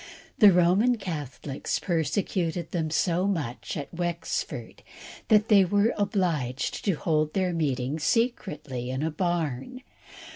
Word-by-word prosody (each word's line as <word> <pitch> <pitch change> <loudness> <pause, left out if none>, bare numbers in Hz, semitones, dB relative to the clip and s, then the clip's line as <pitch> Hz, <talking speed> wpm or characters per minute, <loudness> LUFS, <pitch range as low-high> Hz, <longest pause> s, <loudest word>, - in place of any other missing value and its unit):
The 210 -3 +9
Roman 190 +8 +4
Catholics 145 - -4
persecuted 170 0 -1
them 160 -3 -1
so 175 +3 +1
much 150 -11 -3
at 145 +1 -6
Wexford 170 -1 -4 0.5
that 215 -1 +4
they 200 -3 +6
were 205 +5 +2
obliged 170 - -1
to 195 - +3
hold 155 -1 0
their 185 -2 +1
meeting 140 -2 -1
secretly 150 - -1
in 130 +3 -2
a 160 - 0
barn. 175 - -2
170 Hz, 120 wpm, -27 LUFS, 150-195 Hz, 0.5 s, The